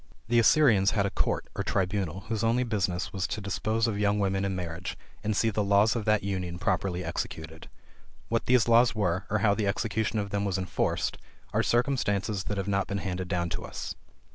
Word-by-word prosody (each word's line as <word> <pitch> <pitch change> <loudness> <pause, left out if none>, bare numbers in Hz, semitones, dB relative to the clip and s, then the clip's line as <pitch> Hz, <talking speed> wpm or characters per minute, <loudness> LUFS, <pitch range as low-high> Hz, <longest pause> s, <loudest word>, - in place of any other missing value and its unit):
The 120 0 +4
Assyrians 110 -4 +5
had 100 - +3
a 100 - -1
court, - - -1
or - - -2
tribunal 95 -1 -1
whose 110 +1 -3
only 115 +2 +2
business 95 -6 -1
was 95 -3 -1
to - - -3
dispose 110 +3 -1
of 105 -3 -1
young 105 0 +2
women 95 -1 0
in 100 -1 -1
marriage, 90 0 -5 0.3
and 105 -1 0
see 115 - +2
the 105 0 0
laws 100 +3 +4
of 115 -3 -2
that 110 -2 +2
union 90 -3 -3
properly 90 -2 -1
executed. 80 0 -5 0.6
What 115 0 -1
these 125 -3 +4
laws 115 0 +5
were, 95 -2 0
or 110 - +1
how 100 - +5
the 105 -1 -1
execution 110 +2 -1
of 100 -2 -2
them 100 0 0
was 100 -2 0
enforced, 95 -2 -1 0.3
are - - +3
circumstances 105 -6 0
that 105 - -3
have 95 - -2
not 100 -1 0
been 100 - -2
handed 95 -2 -3
down 85 -1 -1
to - - -4
us. - - -5
100 Hz, 205 wpm, -28 LUFS, 95-110 Hz, 0.6 s, Assyrians